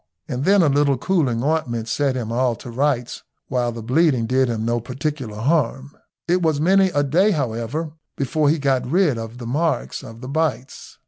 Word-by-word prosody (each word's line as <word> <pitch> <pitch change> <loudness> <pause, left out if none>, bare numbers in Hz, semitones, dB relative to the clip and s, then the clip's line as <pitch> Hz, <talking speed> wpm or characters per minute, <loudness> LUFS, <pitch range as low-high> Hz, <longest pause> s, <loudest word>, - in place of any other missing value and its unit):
And 125 +3 -3
then 195 -1 +5
a - - +4
little 140 -1 +2
cooling 130 -8 0
ointment 130 -7 -1
set 140 +1 0
him 115 -3 -3
all 125 0 +1
to 120 +2 -10
rights, 125 -1 -1 0.3
while 125 -2 0
the 115 -1 -7
bleeding 130 -1 +2
did 130 +3 +2
him 110 -1 -2
no 120 +1 0
particular 130 -2 -4
harm. 140 +1 0 0.3
It 180 +1 +2
was 160 -3 +1
many 190 +4 +4
a 145 -4 +1
day, 170 +9 +3
however, 140 - -2 0.3
before 145 +2 +1
he 160 - +2
got 135 -3 +1
rid 160 -7 +2
of 115 +1 -7
the 120 - -8
marks 155 +7 -1
of 115 +1 -11
the 130 - -7
bites. 140 -3 -3
135 Hz, 190 wpm, -21 LUFS, 120-155 Hz, 0.3 s, then